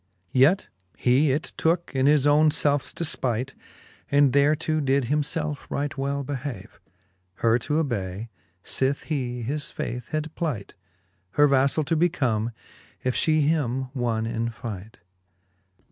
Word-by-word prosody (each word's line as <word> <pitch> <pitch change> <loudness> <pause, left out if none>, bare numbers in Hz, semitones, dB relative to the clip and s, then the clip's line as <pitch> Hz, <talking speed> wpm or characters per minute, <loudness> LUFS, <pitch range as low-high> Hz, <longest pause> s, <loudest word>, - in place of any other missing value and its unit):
Yet 140 +9 +4 0.3
he 135 +4 +3
it 145 +4 -2
tooke 170 +2 +1
in 135 0 +2
his 145 -1 +4
own 150 +1 +5
felfes 145 -2 0
defpight. 130 -5 -2 0.6
And 140 -2 +4
thereto 155 +2 +2
did 135 0 +2
himfelfe 150 +2 -2
right 145 +1 -2
well 140 0 -2
behave, 135 -6 -6 0.6
Her 115 +3 +2
to 150 +5 -2
ob:^y, 110 - -2 0.3
fith 135 +1 0
he 125 -6 -3
his 145 +5 -2
faith 125 -1 -5
had 155 0 -3
plight, 145 - -3 0.6
Her 145 0 +5
vaflall 140 +2 +2
to 165 - +1
become, 130 -10 +1 0.5
if 130 -1 0
fhe 155 -1 +3
him 135 -4 0
wonne 115 -4 -1
in 115 0 -2
fight. 110 -3 -8
140 Hz, 130 wpm, -25 LUFS, 120-150 Hz, 0.6 s, own